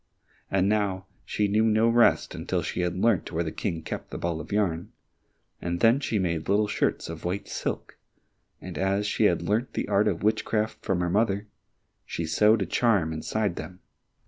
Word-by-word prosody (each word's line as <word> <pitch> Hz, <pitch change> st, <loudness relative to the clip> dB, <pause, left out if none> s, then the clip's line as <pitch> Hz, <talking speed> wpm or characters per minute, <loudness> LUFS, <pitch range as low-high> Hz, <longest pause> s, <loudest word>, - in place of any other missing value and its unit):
And 95 Hz, 0 st, +2 dB
now 100 Hz, -3 st, 0 dB, 0.2 s
she 105 Hz, -, 0 dB
knew 105 Hz, +2 st, +2 dB
no 110 Hz, +1 st, +3 dB
rest 115 Hz, 0 st, +3 dB
until -, -, -2 dB
she -, -, -2 dB
had 90 Hz, 0 st, -1 dB
learnt 105 Hz, -2 st, +2 dB
where 85 Hz, 0 st, 0 dB
the 80 Hz, -, -4 dB
King 80 Hz, -2 st, -3 dB
kept -, -, -6 dB
the -, -, -6 dB
ball 85 Hz, -2 st, -2 dB
of 80 Hz, -, -11 dB
yarn, 100 Hz, -1 st, 0 dB, 0.7 s
and 85 Hz, 0 st, -2 dB
then 115 Hz, +6 st, +5 dB
she 115 Hz, -6 st, -1 dB
made 85 Hz, -4 st, -1 dB
little 105 Hz, +1 st, +3 dB
shirts -, -, -1 dB
of 85 Hz, 0 st, -7 dB
white 90 Hz, +3 st, -3 dB
silk, -, -, -4 dB, 0.6 s
and 90 Hz, -2 st, -7 dB
as 95 Hz, +2 st, +1 dB
she -, -, +1 dB
had -, -, +2 dB
learnt 110 Hz, +5 st, 0 dB
the -, -, -1 dB
art 105 Hz, +1 st, +3 dB
of 95 Hz, -3 st, -1 dB
witchcraft 110 Hz, 0 st, 0 dB
from 90 Hz, -2 st, 0 dB
her 90 Hz, -, 0 dB
mother, 100 Hz, 0 st, +1 dB, 0.6 s
she 85 Hz, -, -4 dB
sewed 105 Hz, +6 st, +4 dB
a -, -, -3 dB
charm 100 Hz, -10 st, +2 dB
inside 100 Hz, +4 st, -2 dB
them. 90 Hz, 0 st, -7 dB
100 Hz, 190 wpm, -27 LUFS, 85-105 Hz, 0.7 s, then